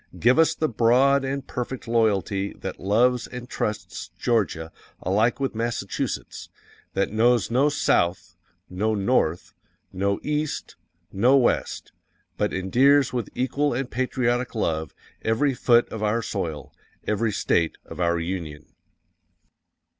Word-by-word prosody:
_ - - -12
Give 125 +6 +4
us 165 - +4
the 155 - 0
broad 130 +4 +3
and 135 0 -3
perfect 125 0 -5
loyalty 100 -4 +1
that - - -7
loves 120 +6 +2
and 125 0 -8
trusts 95 -7 -4
GEORGIA 95 -7 0 0.3
alike 110 +7 +1
with 135 -1 -1
Massachusetts 115 -3 -3 0.5
that 100 +1 0
knows 115 +1 +3
no 135 +5 +3
SOUTH, 85 - 0 0.3
no 105 +4 -1
North, 95 -5 0 0.4
no 100 +1 0
EAST, 150 0 -2 0.4
no 125 +8 +4
West, 125 - 0 0.4
but - - 0
endears 130 +9 +3
with 120 -5 -2
equal 140 +2 0
and 135 0 -3
patriotic 125 -1 -1
love 80 -8 -2 0.3
every 115 +6 +1
foot 120 -1 +3
of 110 - -6
our 110 +2 0
soil, 80 -9 -4 0.3
every 110 +1 0
State 85 -4 0
of - - -10
our 85 0 +2
Union. 80 -4 -5
115 Hz, 130 wpm, -24 LUFS, 95-125 Hz, 0.5 s, Give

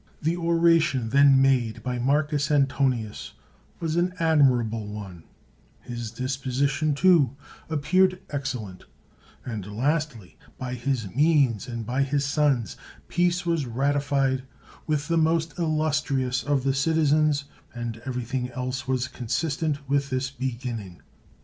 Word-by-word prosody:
The 160 +3 0
oration 165 -7 +2
then 140 +1 +6
made 125 -5 +1
by 125 -1 -2
Marcus 145 +2 +1
Antonius 135 -6 0 0.5
was 165 0 -2
an 180 +1 +1
admirable 125 -9 +2
one; 95 -5 -8 0.5
his 120 -2 -6
disposition, 135 +4 -1
too, 150 -6 +4 0.3
ap 155 -3 -2
peared 185 +3 +3
excellent; 120 -10 -5 0.6
and 105 -3 -6
lastly, 135 - -2 0.2
by 125 -1 -5
his 125 -2 -2
means 140 - +3
and 115 -2 -5
by 130 +5 0
his 140 +1 0
sons', 140 - +1 0.3
peace 175 0 +1
was 165 -6 0
ratified 135 +1 +1 0.5
with 150 -1 0
the 165 -1 +2
most 160 0 +1
illus 155 -3 +1
trious 130 -3 -1
of 140 -3 0
the 135 0 +1
citizens 150 0 +2 0.3
and 115 -2 -6
everything 125 0 -3
else 130 0 -4
was 130 -1 0
consistent 145 +4 -2
with 140 0 +1
this 130 0 -2
beginning. 120 -8 -5
135 Hz, 125 wpm, -25 LUFS, 125-155 Hz, 0.6 s, then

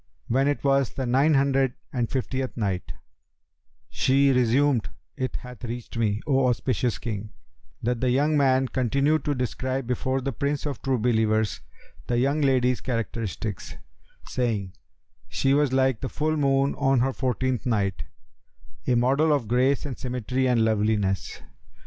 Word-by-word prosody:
When 135 +4 +2
it 145 - -1
was 140 -2 +2
the 135 - -2
Nine 135 +5 +3
Hundred 135 -2 +2 0.2
and 120 -3 -1
Fiftieth 130 0 -3
Night, 95 -5 -2 0.9
She 135 +1 +3
resumed, 125 0 +2 0.3
It 130 -1 -3
hath 125 -2 -9
reached 120 0 -6
me, 110 -2 0
O 135 -3 +2
auspicious 125 -1 0
King, 105 -2 -5 0.5
that 120 0 -1
the 130 - +2
young 145 +5 +2
man 135 -2 +3
continued 140 +4 +1
to 145 - 0
describe 130 +1 -2
before 130 +2 -1
the 135 +1 -3
Prince 140 +3 -2
of 145 -2 -4
True 135 -2 0
Believers 110 -2 +1 0.5
the 120 - 0
young 140 +5 +1
lady's 125 -3 +2
characteristics, 115 -5 -4 0.5
saying, 105 -7 -2 0.5
"She 135 - +1
was 145 -2 +2
like 130 -3 +2
the 130 - -3
full 155 +1 -1
moon 140 -1 +2
on 135 -3 +3
her 135 +1 +1
fourteenth 130 -2 -1
night, 100 -5 0 0.8
a 125 - +3
model 135 +6 +3
of 140 -7 +1
grace 130 +5 +2
and 135 -3 -5
symmetry 125 +1 -1
and 120 -3 +3
loveliness. 105 -3 0
130 Hz, 150 wpm, -25 LUFS, 115-135 Hz, 0.9 s, Nine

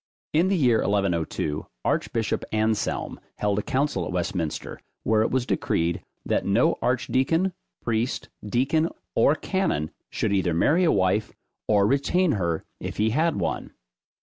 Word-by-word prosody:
In 165 +4 +4
the 195 0 +2
year 125 -7 +4
1102, 85 -6 0 0.2
archbishop 110 -3 0
Anselm 110 0 0 0.2
held 105 0 0
a - - 0
council 130 -5 0
at - - -4
Westminster, 85 -2 -3 0.2
where 110 0 +3
it 110 - +2
was 130 -1 0
decreed, 85 -6 0 0.2
that - - +1
no 100 +5 +2
archdeacon, 135 +8 +1 0.3
priest, 115 +2 -1 0.2
deacon, 135 +9 +1 0.2
or 145 - +4
canon, 175 - -1 0.2
should - - -1
either 90 -4 +1
marry 160 - +3
a 165 - +4
wife, 95 +3 +1 0.3
or 100 -2 +4
retain 145 - +2
her 85 - -1
if - - -5
he 110 +1 +2
had 160 +7 +2
one. 85 -5 -2
110 Hz, 140 wpm, -25 LUFS, 95-140 Hz, 0.3 s, In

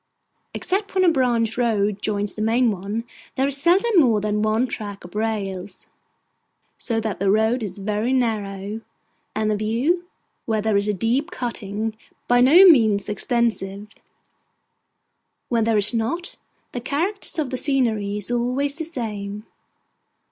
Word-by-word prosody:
Except 390 +1 -2
when 375 - +3
a 350 - +5
branch 240 -5 +1
road 210 -4 +1
joins 205 -1 -1
the 215 - -6
main 230 +2 +2
one, 200 +4 -4 0.3
there 265 +1 +1
is 280 0 +2
seldom 370 +7 +3
more 235 -8 +4
than 210 0 -1
one 215 +3 +2
track 210 -5 -6
of 175 - -12
rails; 205 -4 -4 0.9
so 230 -3 -1
that 220 -3 -3
the 195 0 +1
road 220 +4 +2
is 200 -3 -5
very 210 +4 -1
narrow, 210 -4 -2 0.5
and 215 0 0
the - - +1
view, 250 - 0 0.4
where 220 -1 +1
there 215 0 0
is 200 +1 +1
a 210 - +1
deep 245 - 0
cutting, 220 - -4 0.3
by 245 0 +4
no 320 +10 +8
means 220 - +5
extensive. 210 -3 -1 1.6
When 230 -2 +1
there 225 -1 +2
is 205 +2 +5
not, 285 +11 -2 0.4
the 245 - -5
character 335 - -2
of 285 -4 -2
the - - -1
scenery 230 -7 0
is 210 +3 -5
always 250 +4 0
the 325 - -3
same. 210 -8 -5
225 Hz, 150 wpm, -22 LUFS, 210-255 Hz, 1.6 s, no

